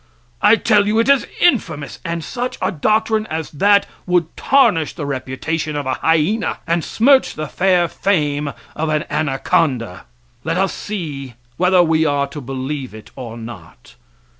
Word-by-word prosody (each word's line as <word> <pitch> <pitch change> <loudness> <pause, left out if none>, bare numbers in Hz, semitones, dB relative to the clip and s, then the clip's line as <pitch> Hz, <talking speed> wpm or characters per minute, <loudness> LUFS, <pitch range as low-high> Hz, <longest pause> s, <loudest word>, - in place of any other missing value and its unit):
I 210 +2 +6
tell 210 -3 +3
you 215 +1 +1
it 230 +4 +2
is 280 -2 +4
infamous! 210 - +1
and 170 -2 -3
such 245 +6 -4
a - - 0
doctrine 215 +5 +1
as 160 0 -4
that 200 +6 +3 0.2
would 175 -3 +1
tarnish 170 - +2
the 155 - -4
reputation 140 +3 -3
of 145 -1 -3
a 130 - 0
hyena 165 +8 +1
and 170 0 0
smirch 265 +4 +3
the 155 - -4
fair 180 +1 +2
fame 150 -7 0 0.2
of 160 +1 -2
an 155 0 0
anaconda. 135 - 0 0.4
Let 165 +2 -1
us 195 +1 +1
see 145 - -6 0.2
whether 180 0 +4
we 160 -1 +2
are 145 -2 +1
to 145 +1 -7
believe 135 -1 -5
it 110 -1 -13
or 120 -3 -7
not. 110 - -11
160 Hz, 160 wpm, -19 LUFS, 140-200 Hz, 0.4 s, I